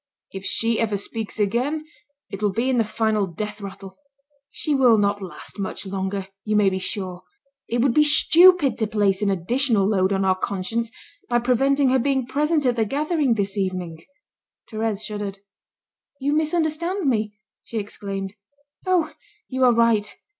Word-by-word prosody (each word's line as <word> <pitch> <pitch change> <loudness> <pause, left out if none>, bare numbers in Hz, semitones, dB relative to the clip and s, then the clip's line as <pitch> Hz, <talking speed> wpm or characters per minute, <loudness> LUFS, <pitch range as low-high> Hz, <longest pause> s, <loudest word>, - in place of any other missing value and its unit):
If 195 0 -7
she 225 +3 +1
ever 215 -3 0
speaks 220 +2 -5
again 250 +10 0 0.5
it 195 - -6
will 205 -1 +2
be 235 +6 0
in 250 - +2
the - - +4
final 215 -2 0
death 210 +4 -6
rattle. 195 -1 -9 0.5
She 300 - -2
will 250 -5 +5
not 205 0 +1
last 190 +2 -9
much 195 +1 -4
longer, 190 0 -3 0.2
you 215 0 -1
may 205 -2 +4
be 190 - -2
sure. 185 -1 -4 0.5
It 235 +1 0
would 265 -3 +3
be 300 - +5
stupid 330 0 +5
to 220 - +1
place 205 -2 +1
an 205 - +1
additional 210 +4 +1
load 190 -2 +2
on 195 0 +1
our 190 - +4
conscience 200 +5 -2 0.4
by 240 - +3
preventing 265 +3 +2
her 260 +1 +3
being 265 0 0
present 295 +3 0
at 245 -1 +2
the 225 - +3
gathering 290 - 0
this 200 -1 -1
evening." 180 -4 -3 0.7
Thérèse 220 -1 -2
shuddered. 205 -2 -5 0.8
"You 285 +2 0
misunderstand 320 +3 0
me," 215 -4 0 0.3
she 230 - -7
exclaimed. 195 -2 -5 0.5
"Oh! 345 -4 +2 0.4
You 260 0 -1
are 250 - +6
right. 230 -3 +2
220 Hz, 165 wpm, -23 LUFS, 195-265 Hz, 0.8 s, are